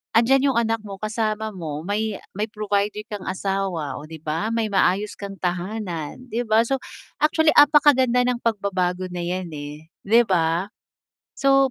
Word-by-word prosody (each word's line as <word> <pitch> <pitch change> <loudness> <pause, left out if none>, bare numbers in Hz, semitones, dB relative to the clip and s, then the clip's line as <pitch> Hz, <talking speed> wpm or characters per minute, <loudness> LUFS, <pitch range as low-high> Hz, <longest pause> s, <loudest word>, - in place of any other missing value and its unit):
Andyan 265 +4 +4
yung 270 - +1
anak 225 -1 +1
mo 200 -2 -8
kasama 215 +1 -2
mo 160 -5 -6
may 210 +2 -1 0.2
may 210 +3 -2
provider 210 0 -1
kang 205 -3 -6
asawa, 190 -7 -2
oh 150 - -10
'di 160 -1 -11
ba, 160 +7 -1
may 225 -2 -1
maayos 195 +2 +2
kang 200 -1 -6
tahanan, 180 - -4
'di 235 +1 -2
ba? 220 +1 +4
So, 270 +2 -1 0.4
actually 310 0 +4
apakaganda 265 -4 +5
ng 245 -1 0
pagbabago 185 -5 -1
na 175 - -5
yan 175 0 -3
eh 150 +2 -8 0.2
'di 235 +3 +6
ba? 175 0 0 0.7
So, 275 -1 +4
205 Hz, 160 wpm, -23 LUFS, 180-230 Hz, 0.7 s, di